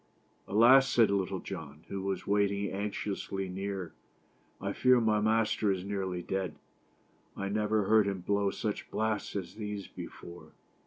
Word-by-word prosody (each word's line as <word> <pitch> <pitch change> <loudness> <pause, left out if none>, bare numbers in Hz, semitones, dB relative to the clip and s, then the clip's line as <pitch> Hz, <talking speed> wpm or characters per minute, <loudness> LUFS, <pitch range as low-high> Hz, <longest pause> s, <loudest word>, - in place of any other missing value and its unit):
" - - -38
Alas!" 125 +6 +6
said 115 -4 +4
Little 95 -2 -1
John, 80 -5 -8
who 100 - -4
was 95 -1 -3
waiting 100 -1 +1
anxiously 100 -1 -3
near, 95 -2 -4 0.3
" - - -37
I 100 +1 -3
fear 125 +2 +5
my 110 -2 +2
master 110 -1 +2
is 95 -1 -2
nearly 95 -3 -3
dead. 95 -4 -2 0.8
I 100 0 -2
never 105 +1 +1
heard 105 +1 +4
him 95 -2 -2
blow 100 +2 +1
such 105 +1 -4
blasts 110 -1 -1
as 95 -4 -4
those 105 -2 -5
before." 85 0 -10
100 Hz, 155 wpm, -31 LUFS, 95-105 Hz, 0.8 s, Alas